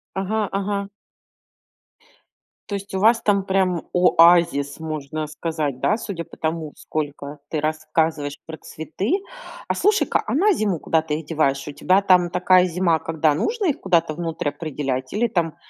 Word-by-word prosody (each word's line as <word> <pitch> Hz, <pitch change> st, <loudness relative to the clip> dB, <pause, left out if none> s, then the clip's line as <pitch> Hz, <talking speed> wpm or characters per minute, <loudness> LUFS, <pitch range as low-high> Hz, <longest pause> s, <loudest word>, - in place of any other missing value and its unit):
Ага, 205 Hz, +2 st, -1 dB
ага. 200 Hz, 0 st, -2 dB, 1.8 s
То 200 Hz, -, -2 dB
есть 200 Hz, 0 st, -7 dB
у 190 Hz, -, -1 dB
вас 230 Hz, +3 st, +4 dB
там 200 Hz, -2 st, +2 dB
прям 190 Hz, -3 st, +1 dB
оазис, 170 Hz, -5 st, +4 dB
можно 155 Hz, -1 st, -4 dB
сказать, 150 Hz, -4 st, -3 dB
да, 215 Hz, -, +2 dB
судя 180 Hz, -7 st, -5 dB
по -, -, -14 dB
тому, 160 Hz, -1 st, -3 dB
сколько 145 Hz, -1 st, -5 dB
ты 155 Hz, -2 st, -2 dB
рассказываешь 155 Hz, -1 st, -1 dB
про 160 Hz, -1 st, -8 dB
цветы. 160 Hz, -, -4 dB, 0.6 s
А -, -, +2 dB
слушай-ка, 420 Hz, +1 st, +2 dB
а -, -, -1 dB
на 400 Hz, +9 st, +4 dB
зиму 205 Hz, -, 0 dB
куда 160 Hz, -1 st, +1 dB
ты 155 Hz, -1 st, -3 dB
их 160 Hz, -, -11 dB
деваешь? 145 Hz, -4 st, 0 dB
У -, -, -4 dB
тебя 185 Hz, +7 st, +2 dB
там 180 Hz, -3 st, +4 dB
такая 180 Hz, +1 st, +4 dB
зима, 170 Hz, -2 st, +1 dB
когда 160 Hz, -2 st, +1 dB
нужно 435 Hz, -, -1 dB
их 280 Hz, -, -2 dB
куда-то 170 Hz, -4 st, +1 dB
внутрь 165 Hz, -3 st, -2 dB
определять, 145 Hz, -3 st, -4 dB
или 235 Hz, +3 st, +1 dB
там 170 Hz, -7 st, -1 dB
165 Hz, 160 wpm, -22 LUFS, 155-195 Hz, 1.8 s, вас